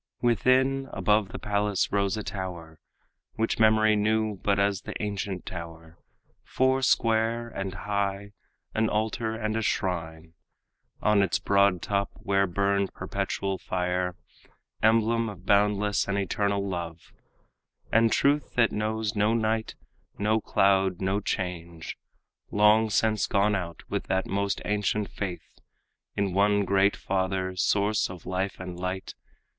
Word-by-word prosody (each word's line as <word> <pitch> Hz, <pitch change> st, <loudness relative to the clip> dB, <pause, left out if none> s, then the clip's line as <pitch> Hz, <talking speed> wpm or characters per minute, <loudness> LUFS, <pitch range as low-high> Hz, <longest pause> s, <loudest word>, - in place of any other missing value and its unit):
Within, 130 Hz, +4 st, +2 dB
above 100 Hz, +1 st, +1 dB
the -, -, -6 dB
palace 105 Hz, -1 st, 0 dB
rose 100 Hz, 0 st, +1 dB
a 105 Hz, -, -4 dB
tower, 90 Hz, -6 st, -6 dB, 0.6 s
Which 115 Hz, +1 st, -1 dB
memory 110 Hz, -1 st, +5 dB
knew 110 Hz, 0 st, +1 dB
but 100 Hz, -1 st, +1 dB
as 100 Hz, -1 st, +1 dB
the -, -, -7 dB
ancient 100 Hz, -3 st, -3 dB
tower, 85 Hz, -2 st, -9 dB, 0.4 s
Foursquare 115 Hz, -3 st, +1 dB
and 95 Hz, -3 st, -5 dB
high, 100 Hz, 0 st, -2 dB, 0.4 s
an 110 Hz, 0 st, +1 dB
altar 110 Hz, +1 st, -1 dB
and 110 Hz, -1 st, -2 dB
a 115 Hz, -, 0 dB
shrine 80 Hz, -5 st, -2 dB, 0.7 s
On 105 Hz, -1 st, +4 dB
its 95 Hz, -3 st, +1 dB
broad 100 Hz, -3 st, +2 dB
top, 100 Hz, -1 st, 0 dB
where 100 Hz, 0 st, +1 dB
burned 100 Hz, +2 st, 0 dB
perpetual 95 Hz, -1 st, -3 dB
fire, 90 Hz, 0 st, -1 dB, 0.7 s
Emblem 115 Hz, +1 st, +3 dB
of 95 Hz, -3 st, -11 dB
boundless 105 Hz, 0 st, +2 dB
and 100 Hz, 0 st, -1 dB
eternal 100 Hz, 0 st, 0 dB
love 85 Hz, -3 st, -6 dB, 0.8 s
And 115 Hz, 0 st, +4 dB
truth 145 Hz, +1 st, +1 dB
that 115 Hz, -2 st, +4 dB
knows 110 Hz, 0 st, -2 dB
no 105 Hz, +2 st, +2 dB
night, 110 Hz, 0 st, -1 dB, 0.4 s
no 110 Hz, +2 st, +1 dB
cloud, 95 Hz, -3 st, +2 dB
no 95 Hz, +1 st, 0 dB
change, 85 Hz, -4 st, -4 dB, 0.5 s
Long 105 Hz, +2 st, +4 dB
since 110 Hz, -1 st, +1 dB
gone 100 Hz, +1 st, +2 dB
out, 90 Hz, -4 st, -4 dB
with -, -, -3 dB
that 95 Hz, 0 st, 0 dB
most 100 Hz, 0 st, -1 dB
ancient 105 Hz, 0 st, -1 dB
faith 95 Hz, -4 st, -6 dB, 0.6 s
In 100 Hz, -2 st, -1 dB
one 100 Hz, +1 st, +3 dB
great 100 Hz, +1 st, +3 dB
Father, 95 Hz, -1 st, -2 dB
source 100 Hz, +3 st, +1 dB
of 90 Hz, -3 st, -10 dB
life 95 Hz, +1 st, -2 dB
and 90 Hz, -1 st, -7 dB
light. 95 Hz, +1 st, -4 dB
100 Hz, 130 wpm, -27 LUFS, 95-110 Hz, 0.8 s, memory